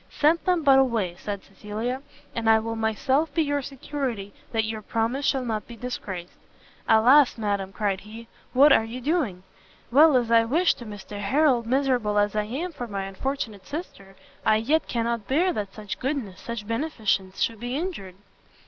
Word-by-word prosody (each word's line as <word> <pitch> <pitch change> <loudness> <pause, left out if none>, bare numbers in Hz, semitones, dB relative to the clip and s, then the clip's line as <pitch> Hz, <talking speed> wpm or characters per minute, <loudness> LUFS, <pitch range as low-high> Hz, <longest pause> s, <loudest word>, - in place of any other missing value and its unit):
"Send 315 +3 +3
them 360 -3 +2
but 270 -2 +6
away," 230 -9 +1
said 200 -2 -5
Cecilia, 220 +6 -5 0.3
"and 225 -1 0
I 220 - +7
will 225 +1 -3
myself 260 +8 +1
be 325 - +3
your 285 -1 0
security 260 -6 -4 0.2
that 225 -1 +1
your 220 0 -4
promise 230 +6 -1
shall 265 -2 +1
not 215 -3 -3
be 235 - -9
disgraced." 195 -7 -6 0.5
"Alas, 245 +6 +6
madam," 200 -3 -2
cried 200 -2 -1
he, 220 +3 -11 0.2
"what 275 +4 +7
are - - +4
you 230 +3 -6
doing? 255 - -1 0.5
well 295 +2 +7
as 235 -2 0
I 230 0 +6
wish 325 +10 +3
to 240 - -11
Mr 205 0 -8
Harrel, 260 +4 +3
miserable 250 -5 +1
as 205 0 +2
I 210 0 +1
am 290 +11 -4
for 245 -6 -6
my 200 -3 -3
unfortunate 205 0 -4
sister, 200 - -7 0.3
I 215 - +4
yet 280 +9 +1
cannot 230 -3 -2
bear 345 +7 +2
that 200 -6 -4
such 210 -2 -6
goodness, 255 -9 -3
such 235 -3 -5
beneficence 220 -6 -1
should 225 -2 0
be 245 +2 -4
injured!" 285 - -4
230 Hz, 175 wpm, -25 LUFS, 210-275 Hz, 0.5 s, I